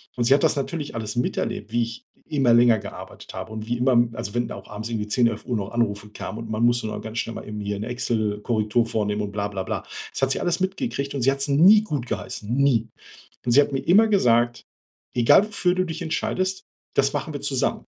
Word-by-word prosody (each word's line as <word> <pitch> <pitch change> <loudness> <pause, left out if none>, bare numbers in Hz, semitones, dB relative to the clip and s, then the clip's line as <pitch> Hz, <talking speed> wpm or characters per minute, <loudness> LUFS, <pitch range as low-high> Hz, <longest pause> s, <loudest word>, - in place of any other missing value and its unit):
Und 120 - 0
sie 130 - +6
hat 140 - +3
das - - +3
natürlich 145 +2 -3
alles 110 -2 -4
miterlebt, 115 -3 -2
wie 120 +1 +1
ich 115 0 -7 0.3
immer 135 -6 +3
länger 120 -1 +6
gearbeitet - - -10
habe. 110 - -6
Und 110 0 -6
wie 120 +1 -1
immer 125 0 +3 0.2
also, 105 -1 -6
wenn 120 -1 -1
auch 100 -1 -8
abends 110 +2 -6
irgendwie 110 -2 -3
10:00, 120 +3 +3
11:00 115 +1 -2
noch 100 0 -4
Anrufe 105 -3 -1
kamen 105 +1 -7
und 115 -1 -7
man 110 +1 -1
musste 120 -1 +3
noch 105 -1 -5
ganz 110 +1 -7
schnell 115 - -2
mal - - -6
irgendwie 105 -1 -4
'ne 105 +3 -4
Excel 110 -4 -1
Korrektur 110 +1 +1
vornehmen 105 -2 -1
und 100 - -4
bla, 100 0 -2
bla, 100 -2 -4
bla. - - -3 0.3
Das - - -6
hat 135 0 +2
sie - - 0
alles 175 0 0
mitgekriegt 190 - -2
und 135 - -2
sie 135 - +5
hat 140 - -3
es 140 - -1
nie 180 +10 +7
gutgeheissen, 120 - -4
nie. 135 -5 +3 0.6
Und 120 - +1
sie 145 - +8
hat 145 - -1
mir 135 - -1
immer 210 +9 +5
gesagt: 120 - +2 0.5
„Egal, 120 - +6
wofür 190 -4 +1
du 185 - +2
dich 165 +1 -6
entscheidest, 185 +3 -1 0.3
das - - +3
machen - - -3
wir - - -5
zusammen,“ - - -1
120 Hz, 230 wpm, -24 LUFS, 110-140 Hz, 0.6 s, sie